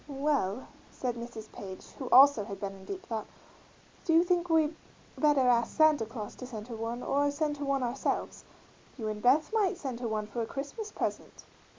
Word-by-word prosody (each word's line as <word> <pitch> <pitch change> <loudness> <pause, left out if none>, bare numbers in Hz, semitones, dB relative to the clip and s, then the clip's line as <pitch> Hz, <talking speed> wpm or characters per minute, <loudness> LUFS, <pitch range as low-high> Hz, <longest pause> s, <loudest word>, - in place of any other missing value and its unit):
"Well," 270 -6 -1 0.2
said 250 -2 -3
Mrs. 235 -2 -8
Page, 190 -1 -9
who 260 - -4
also 270 -3 +7
had 200 -2 -7
been 195 -1 -4
in 190 -1 -13
deep 385 -1 -6
thought, 220 -2 -4 0.8
"do 330 - +1
you 330 +1 +7
think 355 -1 +1
we 320 -1 +3 0.4
better 295 -3 +3
ask 235 -1 +2
Santa 310 -8 +5
Claus 215 -2 -6
to 255 - -7
send 220 -2 -8
her 235 - -5
one, 230 +2 -4
or 285 +1 +2
send 295 0 -1
her 285 - -4
one 275 -1 +1
ourselves? 245 +2 -2 0.5
You 220 -4 -3
and 210 0 -4
Beth 290 - +3
might 405 -4 +2
send 265 -8 -5
her 245 - -2
one 215 -1 -1
for 215 +3 -4
a 225 - -2
Christmas 285 - -5
present." - - -4
255 Hz, 200 wpm, -30 LUFS, 225-300 Hz, 0.8 s, also